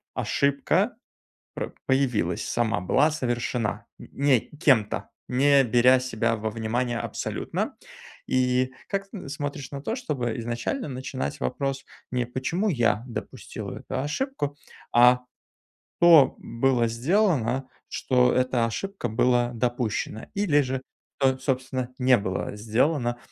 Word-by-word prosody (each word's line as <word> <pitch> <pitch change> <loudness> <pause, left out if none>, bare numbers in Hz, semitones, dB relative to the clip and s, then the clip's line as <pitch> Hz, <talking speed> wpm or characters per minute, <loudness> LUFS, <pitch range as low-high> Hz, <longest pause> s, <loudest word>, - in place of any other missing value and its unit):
ошибка 140 0 +1 0.6
пр - - -4
появилась 125 -10 +1
сама, 115 -4 0
была 135 - +3
совершена 120 -5 -2
н - - -11
не 140 -3 +3 0.2
кем-то, 135 -9 +2 0.2
не 140 +2 +4
беря 125 +2 +5
себя 115 -2 0
во 110 0 -3
внимание 115 +2 -1
абсолютно, - - -3 0.5
и 130 0 +2 0.2
как 195 0 -3
тн 200 -8 -8
смотришь 140 -2 -5
на 140 -1 -5
то, 225 - -2
чтобы 130 - -3
изначально 120 - -3
начинать 130 - -4
вопрос 135 - -2 0.3
не: 125 -1 0
"Почему 145 - -1
я 115 - +1
допустила 120 - -7
эту - - -4
ошибку?", 145 - -2 0.4
а: 125 +1 +6 0.8
"Что 165 -6 +7
было 120 0 +1
сделано, 130 - +1 0.2
что 125 -1 +2
эта 125 -2 +2
ошибка 195 - -3
была 120 +2 +2
допущена 115 -2 -2
или 195 -8 +3
же 130 -1 -2 0.4
со 130 -1 +3
собственно 130 -1 -2
не 125 -1 +5
было 100 0 -3
сделано, 120 +4 +1
130 Hz, 120 wpm, -26 LUFS, 120-140 Hz, 0.8 s, Что